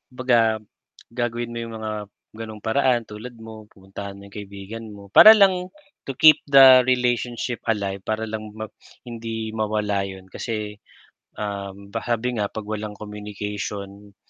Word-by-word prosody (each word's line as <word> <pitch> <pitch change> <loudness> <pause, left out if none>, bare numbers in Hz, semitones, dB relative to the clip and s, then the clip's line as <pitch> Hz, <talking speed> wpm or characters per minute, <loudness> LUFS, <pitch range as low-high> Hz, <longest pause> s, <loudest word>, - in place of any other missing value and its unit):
'baga 115 -4 +2 0.5
gagawin 120 0 -3
mo 120 - -6
'yung 115 -1 -7
mga 110 0 -4 0.5
ganung 110 -2 -8
paraan 125 +1 +2
tulad 110 +4 -9
mo 110 -1 -10
pupuntahan 100 +1 -9
mo 100 - -13
'yung 100 - -16
kaibigan 100 +2 -8
mo, 100 -1 -13
para 215 - +10
lang 190 -4 +3 0.4
to 135 - -4
keep 155 +3 +7
the 135 -3 +8
relationship 125 -1 0
alive, 100 -3 -1
para 110 0 -2
lang 110 -1 -6
ma 110 0 -7 0.4
hindi 115 -2 -5
mawala 105 -2 -1
'yun, 95 -1 -10
kasi, 105 0 -5 0.6
um, 100 -1 -6
pa 115 - -2
sabi 120 0 -1
nga 100 - 0
'pag 110 -1 -6
walang 105 -1 -5
communication 105 -1 -7
110 Hz, 145 wpm, -23 LUFS, 105-120 Hz, 0.6 s, para